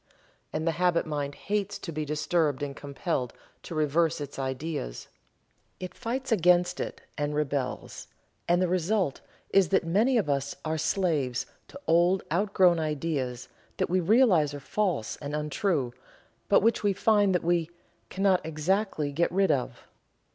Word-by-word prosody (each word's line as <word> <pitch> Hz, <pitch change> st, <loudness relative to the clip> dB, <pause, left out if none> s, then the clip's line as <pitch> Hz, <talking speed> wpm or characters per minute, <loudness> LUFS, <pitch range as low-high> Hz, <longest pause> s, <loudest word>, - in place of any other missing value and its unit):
And 155 Hz, +1 st, -2 dB
the 165 Hz, -, +2 dB
habit 175 Hz, -2 st, +3 dB
mind 145 Hz, -2 st, -3 dB
hates 205 Hz, -1 st, -2 dB
to 170 Hz, -, -7 dB
be 155 Hz, -1 st, -3 dB
disturbed 150 Hz, -1 st, 0 dB
and 140 Hz, -1 st, -4 dB
compelled 140 Hz, -3 st, -3 dB, 0.3 s
to 170 Hz, -, -8 dB
revise 160 Hz, +2 st, +1 dB
its 145 Hz, -1 st, -7 dB
ideas. 130 Hz, -, -4 dB, 0.7 s
It 185 Hz, -1 st, -6 dB
fights 255 Hz, +2 st, -4 dB
against 180 Hz, -3 st, +3 dB
it, -, -, -5 dB, 0.2 s
and 145 Hz, 0 st, -1 dB
rebels, 140 Hz, -3 st, -3 dB, 0.4 s
and 175 Hz, +1 st, +3 dB
the -, -, +2 dB
result 180 Hz, -3 st, 0 dB, 0.3 s
is 195 Hz, -2 st, +4 dB
that 190 Hz, -, +3 dB
many 215 Hz, +10 st, +2 dB
of 215 Hz, -, +1 dB
us 140 Hz, 0 st, -1 dB
are 160 Hz, 0 st, -1 dB
slaves 155 Hz, -8 st, 0 dB, 0.2 s
to 280 Hz, -, -11 dB
old 175 Hz, +3 st, +3 dB
outgrown 185 Hz, -2 st, +3 dB
ideas 145 Hz, -5 st, -2 dB, 0.3 s
that -, -, -1 dB
we 185 Hz, -, +3 dB
realize 180 Hz, -, +4 dB
are -, -, -6 dB
false 180 Hz, -, -1 dB
and 145 Hz, 0 st, -5 dB
untrue, 150 Hz, -3 st, -1 dB, 0.6 s
but 200 Hz, -, +5 dB
which 225 Hz, +2 st, +2 dB
we 205 Hz, -2 st, +2 dB
find 205 Hz, -1 st, +3 dB
that 180 Hz, -, 0 dB
we 170 Hz, -1 st, +1 dB, 0.4 s
"cannot 190 Hz, -1 st, +2 dB
exactly 160 Hz, 0 st, -1 dB
get 170 Hz, +4 st, +1 dB
rid 195 Hz, +2 st, +3 dB
of." 125 Hz, -2 st, -2 dB
165 Hz, 155 wpm, -28 LUFS, 145-190 Hz, 0.7 s, but